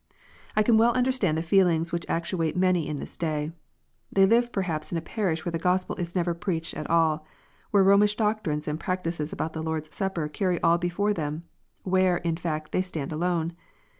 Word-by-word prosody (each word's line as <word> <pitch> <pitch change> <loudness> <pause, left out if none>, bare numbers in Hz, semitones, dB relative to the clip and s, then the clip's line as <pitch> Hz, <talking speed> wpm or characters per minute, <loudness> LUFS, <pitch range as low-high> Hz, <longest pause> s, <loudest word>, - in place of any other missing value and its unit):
I 215 - +4
can 220 0 +4
well 235 +1 +4
understand 250 -10 +1
the 160 - -1
feelings 170 -2 +3
which 170 0 -3
actuate 170 -1 -1
many 180 -3 +2
in 150 - -3
this - - -6
day. 155 -2 -2 0.6
They 195 0 +5
live 240 +4 +3
perhaps 165 -7 -2
in 170 - -1
a - - 0
parish 165 -2 -2
where 175 - -1
the 165 - -2
Gospel 185 +2 +1
is 175 0 -4
never 175 -1 +1
preached 170 -1 -2
at - - -5
all, 160 -2 +2 0.5
where 200 -2 +4
Romish 200 +2 +5
doctrines 210 -9 -1
and 150 +1 -2
practices 165 -4 -2
about 160 - -3
the 160 - -4
Lord 160 -1 -2
s 155 - -12
Supper 190 -6 -1
carry 180 +3 -1
all 170 +1 +4
before 180 +4 0
them, 155 -2 -3 0.4
where, 185 -1 +3
in 170 -1 -1
fact, 155 -2 -4
they - - +1
stand 160 -6 -4
alone. 170 0 -1
170 Hz, 195 wpm, -26 LUFS, 160-190 Hz, 0.6 s, They